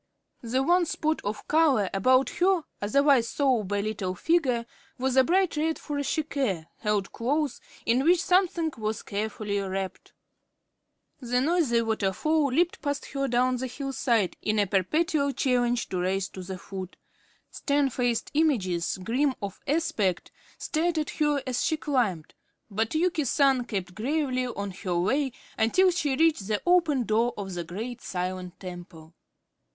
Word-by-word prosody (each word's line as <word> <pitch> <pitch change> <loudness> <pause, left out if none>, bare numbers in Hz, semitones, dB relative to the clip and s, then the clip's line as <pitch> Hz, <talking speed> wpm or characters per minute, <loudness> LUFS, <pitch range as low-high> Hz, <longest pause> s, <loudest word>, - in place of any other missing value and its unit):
The 255 +3 0
one 345 +3 +3
spot 315 0 -1
of 210 +1 -4
color 300 -10 +3
about 255 +6 +3
her 365 -2 +3 0.2
otherwise 265 +3 +3
sober 225 -9 +1
little 200 -4 -3
figure 255 - +1 0.3
was 260 0 0
a 265 - +7
bright 365 +4 +2
red 320 +1 +1
furoshike 285 - -2
held 210 -3 -1
close, 280 +3 -1 0.2
in 245 +3 +2
which 345 +3 +5
something 355 -3 +2
was 215 0 -2
carefully 210 0 -3
wrapped. 195 -1 -4 1.1
A 245 0 0
noisy 275 -5 +2
waterfall 225 +8 +1
leaped 330 +7 +1
past 285 -1 -2
her 275 0 -1
down 250 +1 +2
the 260 +1 -3
hillside 255 -6 -1
in 215 0 0
a 205 - +3
perpetual 280 - +1
challenge 245 -2 +1
to 185 - -2
race 190 +2 -1
to 190 - -9
the 185 +1 -6
foot. 190 0 -8 0.5
Stern 280 -2 +1
faced 245 -1 -1
images, 200 - +1
grim 260 +6 +1
of 200 -2 -6
aspect, 220 - 0 0.3
stared 330 +1 -1
at 305 - -1
her 295 -2 0
as 255 -2 -1
she 315 - +1
climbed, 235 - -1 0.4
but 220 +6 -1
Yuki 330 -1 +1
San 270 -1 +3
kept 190 -6 -4
gravely 255 - -1
on 200 -4 -4
her 180 -1 -3
way 265 +9 +1 0.3
until 365 +13 +4
she 295 -6 0
reached 310 -9 +2
the 210 -1 0
open 335 -7 +3
door 230 +2 +1
of 195 -2 -5
the 175 -1 -3
great 225 +9 -6
silent 180 0 -4
temple. 175 -3 -10
250 Hz, 145 wpm, -27 LUFS, 200-295 Hz, 1.1 s, a